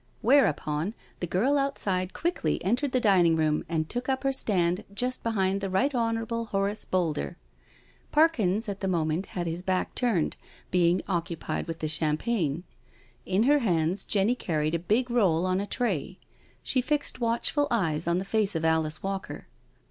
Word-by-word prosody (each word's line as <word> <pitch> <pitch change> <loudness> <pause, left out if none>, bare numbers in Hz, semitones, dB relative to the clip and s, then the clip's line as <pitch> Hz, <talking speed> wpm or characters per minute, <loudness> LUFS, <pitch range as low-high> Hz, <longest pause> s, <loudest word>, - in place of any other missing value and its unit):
Whereupon 200 - +2 0.2
the 175 - -2
girl 255 - +2
outside 195 -10 -1
quickly 330 - -1
entered 250 +7 +1
the 255 - +2
dining 185 -8 +4
room 155 -1 +1
and 160 -2 -1
took 245 +6 -4
up 265 0 0
her 270 0 +1
stand 180 -6 +1
just 250 +5 -3
behind 195 -3 0
the 195 - -2
Right 260 +10 +1
Hon. 230 -2 +1 0.3
Horace 200 0 -2
Boulder. 175 -1 -1 0.7
Parkins 230 - +3
at 200 -1 -4
the 195 - -2
moment 165 0 0
had 175 - -1
his 165 +1 -3
back 185 0 -1
turned, 225 -11 0 0.3
being 175 0 +3
occupied 170 -3 -3
with 165 0 -5
the 155 - 0
cham 155 0 +2
pagne. 175 -8 -1 0.6
In 190 +3 +2
her 290 +4 +4
hands 180 - 0
Jenny 205 +3 +2
carried 155 -9 -1
a 170 - +1
big 230 +8 0
roll 185 -8 +3
on 185 0 +1
a 205 - -4
tray. 190 - -2 0.5
She 255 - +1
fixed 290 -1 -1
watchful 235 +5 +1
eyes 165 -8 0
on 170 0 +2
the 190 - -2
face 210 -2 +1
of 160 0 -1
Alice 160 -1 +1
Walker. 195 0 -4
190 Hz, 170 wpm, -27 LUFS, 170-235 Hz, 0.7 s, dining